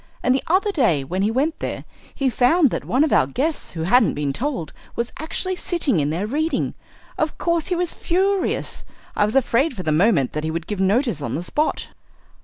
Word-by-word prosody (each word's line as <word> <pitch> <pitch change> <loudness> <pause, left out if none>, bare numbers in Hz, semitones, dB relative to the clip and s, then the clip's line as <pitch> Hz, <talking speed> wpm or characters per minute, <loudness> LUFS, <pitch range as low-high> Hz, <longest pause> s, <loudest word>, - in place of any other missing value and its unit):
And 255 - +4
the 265 - +1
other 380 +5 +2
day 225 - +2
when 180 +8 -2
he 205 - +2
went 280 +8 0
there - - -4 0.3
he 275 - 0
found 260 +4 +3
that - - -3
one 260 +5 +2
of 310 - +1
our - - +4
guests 290 - -2
who 160 -2 -3
hadn't 245 +9 +4
been 145 -2 -1
told, 250 - -3 0.2
was 235 +1 -2
actually 370 +4 -2
sitting 325 - 0
in 145 0 +1
there 170 +6 -1
reading. 310 +8 -1 0.5
Of 310 0 -1
course 340 -2 0
he 360 - 0
was 350 -1 -1
furious. 385 +2 0 0.3
I 205 - +3
was 210 - -2
afraid 270 +2 +2
for 185 - -5
the 155 - 0
moment 165 - +3
that 155 - -3
he 160 - -1
would 165 0 -3
give 205 -2 -4
notice 200 - +1
on 140 - -3
the 165 - -3
spot." 300 +11 -1
250 Hz, 210 wpm, -22 LUFS, -, 0.5 s, And